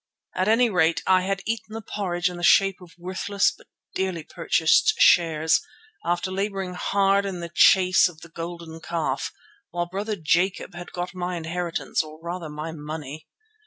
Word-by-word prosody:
At 185 +1 0
any 230 +3 +4
rate 170 -6 +2
I 185 -1 +4
had 195 +1 -2
eaten 225 -1 -4
the 225 - -5
porridge 180 -4 -2
in 180 -1 -4
the - - -7
shape 195 +1 +4
of 170 -3 -15
worthless 190 +3 0
but - - -18 0.3
dearly 185 -4 -2
purchased 170 - +2
shares, 160 - +4 0.4
after 175 +2 -1
labouring 195 -1 -2
hard 195 +2 +2
at 195 - -4
the 170 -1 -6
chase 185 -3 +5
of 160 -3 -15
the 170 - -12
golden 165 -1 -7
calf, 155 -6 -2 0.4
while 175 0 -2
brother 200 +5 -3
Jacob 180 +3 0
had 175 0 -9
got 180 +1 -4
my 180 0 -3
inheritance, 170 +1 -2
or 155 0 -11
rather 170 -1 -5
my 150 +2 -5
money. 150 -1 -7
175 Hz, 165 wpm, -24 LUFS, 165-190 Hz, 0.4 s, chase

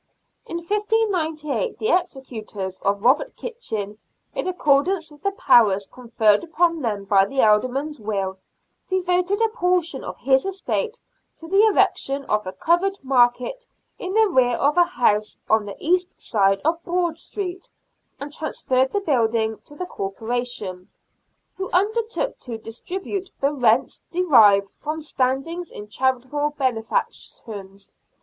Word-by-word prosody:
In 335 - -4
1598 380 - -1
the 435 - -1
executors 230 - -3
of 200 +1 -1
Robert 295 - +3
Kitchin, 215 - -5 0.3
in - - -3
accordance 330 0 +1
with 295 - -17
the 395 - +1
powers 215 - +4
conferred 225 -4 +2
upon 335 0 +1
them 210 -5 -2
by 195 -1 +5
the 270 +5 +1
Alderman's 255 +8 +2
will, 195 -3 -3 0.5
devoted 365 +1 +1
a 450 - +3
portion 360 - 0
of - - -6
his 265 +1 +3
estate 415 +5 -2 0.4
to 325 - -11
the 390 +4 +4
erection 275 -9 +1
of 210 -2 0
a - - -3
covered 355 - +1
market 260 - +2 0.3
in 375 +2 -4
the 445 0 +5
rear 255 -9 +3
of 285 +4 +2
a 350 0 +6
house 215 -10 +1
on 220 -1 +3
the 200 - -6
east 360 +2 0
side 195 -2 +2
of 335 +1 +1
Broad 345 -2 -1
Street, 370 -1 -6 0.5
and 285 +1 -7
transferred 265 -4 0
the 405 - 0
building 225 - +1
to 290 - -14
the 365 - -4
Corporation, 210 - -4 0.7
who 380 0 -4
undertook 445 +6 0
to 235 -3 -6
distribute 370 - -5
the 280 +2 +1
rents 245 -2 +2
derived 215 - +5
from 305 +1 -4
standings 300 +4 -2
in 205 - -8
charitable 260 +5 -1
benefactions. 220 -5 -4
280 Hz, 135 wpm, -23 LUFS, 220-360 Hz, 0.7 s, a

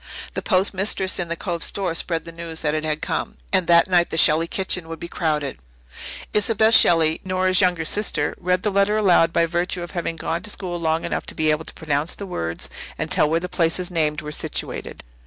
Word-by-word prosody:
The - - -3
post 190 0 +1
mistress 190 -1 +1
in 175 - -2
the 170 - -3
Cove 170 -1 -4
store 190 -4 -2
spread 165 0 -2
the 165 - -9
news 165 -1 -5
that 150 -1 +1
it 155 0 -1
had 155 0 -2
come, - - -3 0.2
and 185 -3 +2
that 170 -1 +5
night 175 -2 +3
the 160 - -3
Shelley 160 +1 +5
kitchen 185 -2 0
would 165 -1 -7
be 170 - -6
crowded. 150 -5 -2 0.7
Isobel 220 +1 +3
Shelley, 165 -7 +5
Nora's 185 0 +2
younger 175 -3 +1
sister, 210 +6 +1
read 180 0 0
the 210 - 0
letter 200 +2 +2
aloud 175 -5 +4
by 170 - +2
virtue 175 +1 -2
of 175 - -8
having 170 -2 -3
gone 165 +1 -3
to 195 - -5
school 180 -4 -3
long 160 0 0
enough - - -3
to - - -7
be 155 -1 +2
able 155 +1 -2
to - - -7
pronounce 150 0 -1
the 200 - -7
words 85 - -4 0.3
and - - -4
tell 150 - +3
where 165 +1 +1
the 180 - -5
places 175 +1 -1
named 155 -2 0
were 150 - -6
situated. - - -4
170 Hz, 220 wpm, -22 LUFS, 160-185 Hz, 0.7 s, that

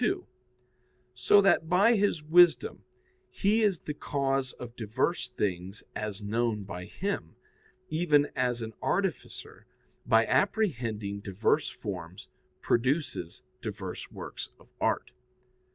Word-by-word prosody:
2); 375 +4 0 0.9
so 200 +11 +5
that 195 -5 +3
by 200 +6 +5
His 200 -7 +1
wisdom 175 - +4 0.5
He 210 +3 +2
is 200 -6 +2
the 150 - -4
cause 135 -3 -1
of 120 -1 -9
diverse 125 +6 -1
things 95 -4 -3
as 105 -1 -4
known 110 0 0
by 90 -2 -7
Him, 195 - -4 0.5
even 155 -3 +2
as 125 -2 0
an 110 0 -6
artificer, - - -3 0.4
by 115 0 +5
apprehending 115 - 0
diverse 105 +9 +1
forms, 90 -4 -7 0.3
produces 125 - 0 0.2
diverse - - -5
works - - -7
of - - -21
art. - - 0
125 Hz, 115 wpm, -29 LUFS, 105-175 Hz, 0.9 s, so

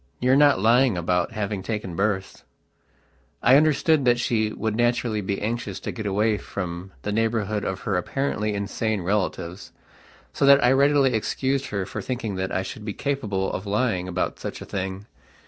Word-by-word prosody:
You 125 +1 +2
are - - +6
not 145 -5 +5
lying 115 0 +4
about 90 +5 0
having 105 -2 -3
taken 105 -3 -4
berths?" 95 -1 -2 1.0
I 125 - +7
understood 155 0 +3
that 120 -1 +4
she 110 -3 0
would 110 0 -2
naturally 120 -2 +1
be 100 0 -2
anxious 115 +3 -3
to - - -4
get 110 -3 -5
away 105 +2 +1
from 90 0 -6
the 105 - -2
neighbourhood 110 -1 0
of 95 0 -3
her 100 - -1
apparently 105 0 -1
insane 100 +1 -2
relatives, 90 -2 -2 0.6
so - - -2
that 140 -1 +7
I 125 - +5
readily 140 -1 +4
excused 135 +5 -1
her 100 -2 -2
for - - -5
thinking 120 -5 -3
that 95 0 -2
I 95 - -1
should 105 - -8
be 105 -1 -4
capable 105 -10 -2
of 95 - -4
lying 100 -4 0
about 90 - -2
such - - -6
a - - -8
thing. 95 0 -4
105 Hz, 180 wpm, -24 LUFS, 95-125 Hz, 1.0 s, I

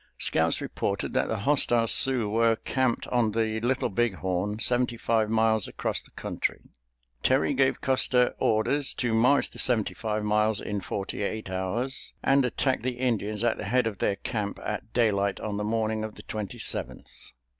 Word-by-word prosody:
Scouts - - +1
reported - - -3
that - - +1
the 110 -3 -2
hostile 120 -3 +2
Sioux 125 -2 +4
were 115 +2 +3
camped 130 +1 -1
on 115 -4 +1
the 110 0 0
Little 125 +3 0
Big 115 0 0
Horn, 95 +3 -2
seventy 120 +1 +1
five 110 -2 +1
miles 110 -2 +2
across - - -2
the - - -20
country. - - -3 0.6
Terry 135 +2 +2
gave 135 0 +1
Custer 130 -2 +2
orders 135 +6 +1
to 120 -3 -1
march 125 +6 +3
the - - -7
seventy 115 -5 +2
five 110 -1 -3
miles 105 0 +2
in 100 -1 -4
forty 95 +2 -4
eight 105 -1 -3
hours, 105 +9 -2
and 135 0 +4
attack 130 +1 0
the 125 +1 -3
Indians 110 -4 -1
at 120 -1 +1
the - - -5
head 125 +4 +2
of 110 -4 -3
their 100 - +1
camp 105 0 -4
at 105 +1 -4
daylight 100 -4 +1
on 105 -2 -4
the 105 - -2
morning 110 0 -1
of 110 -1 -6
the - - -12
Twenty 110 +2 -5
seventh. 110 - -4
110 Hz, 175 wpm, -27 LUFS, 105-125 Hz, 0.6 s, Sioux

